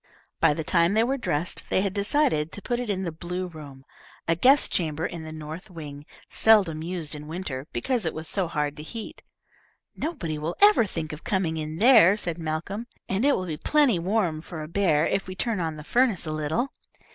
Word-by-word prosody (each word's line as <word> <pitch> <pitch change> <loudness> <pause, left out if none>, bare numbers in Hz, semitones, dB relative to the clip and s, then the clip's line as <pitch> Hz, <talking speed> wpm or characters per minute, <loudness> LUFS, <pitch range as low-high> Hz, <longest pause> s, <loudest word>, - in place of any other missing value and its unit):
By 150 - +4
the 160 - -3
time 170 +4 +2
they 220 - +4
were 260 +3 0
dressed, 175 - -2
they - - +2
had 195 -2 -1
decided 200 - +2
to 205 - -6
put 240 -1 -1
it 245 -3 -4
in 190 -2 -1
the 170 - -3
blue 180 +3 -4
room, 145 -6 -11 0.4
a 165 - +3
guest 265 - +5
chamber 160 -1 0
in 170 -2 -5
the 155 - -7
north 155 +5 -8
wing, 150 -4 -9 0.2
seldom 195 -8 +4
used 165 -2 -3
in 150 0 -5
winter, 155 -5 -5
because 255 -4 -1
it 160 - -1
was 160 0 -4
so 190 +1 +1
hard 150 -3 -2
to - - -6
heat. 220 +8 -7 0.7
"Nobody 175 - -3
will 160 +3 -3
ever 410 - +6
think 160 -4 -5
of 155 - -9
coming 180 -5 -1
in 155 +1 -5
here," 215 -5 +7
said 170 -5 -4
Malcolm, 165 +8 -4 0.2
"and 195 +4 -1
it 285 0 +4
will 185 - -3
be 160 -4 -4
plenty 285 - +3
warm 180 -4 0
for 160 -1 -7
a - - -7
bear 165 -3 +2
if 195 - -1
we 185 - -6
turn 225 0 -1
on 160 -2 -2
the 150 - -9
furnace 235 - +2
a 155 - -3
little." 155 - -1
170 Hz, 215 wpm, -26 LUFS, 155-210 Hz, 0.7 s, here